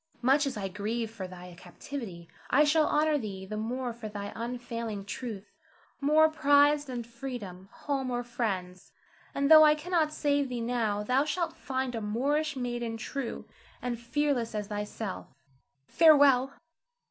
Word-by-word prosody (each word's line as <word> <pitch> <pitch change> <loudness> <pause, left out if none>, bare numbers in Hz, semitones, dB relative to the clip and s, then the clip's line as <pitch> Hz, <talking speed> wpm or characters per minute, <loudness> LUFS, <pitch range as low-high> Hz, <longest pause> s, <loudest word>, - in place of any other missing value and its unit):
Much 275 +3 +4
as 260 -5 -4
I 195 -2 -2
grieve 215 +4 -3
for 200 -5 -6
thy 180 0 -11
captivity, 180 0 -8 0.2
I 290 +4 +5
shall 305 +1 +3
honor 300 0 +2
thee 195 -5 -6
the 215 +3 -6
more 240 +3 -3
for 225 -2 -7
thy 205 -1 -6
unfailing 230 -3 -5
truth, 210 -2 -7 0.5
more 305 +3 +5
prized 290 -1 +4
than 245 -2 -4
freedom, 235 -6 -8
home, 275 -3 -3
or 245 0 -2
friends. 195 -7 -4 0.4
And 280 +2 +1
though 310 0 +11
I 300 0 +6
cannot 320 0 0
save 285 -2 0
thee 245 -1 -3
now, 230 -3 -1
thou 255 +5 +2
shalt 335 +3 -2
find 260 -1 -3
a 225 - -3
Moorish 285 +8 0
maiden 240 -2 -3
true 260 +2 -5 0.3
and 245 -2 -3
fearless 245 -2 -1
as 210 -1 -3
thyself. 210 -1 -5 0.6
Farewell! 280 - +5
245 Hz, 150 wpm, -29 LUFS, 215-285 Hz, 0.6 s, though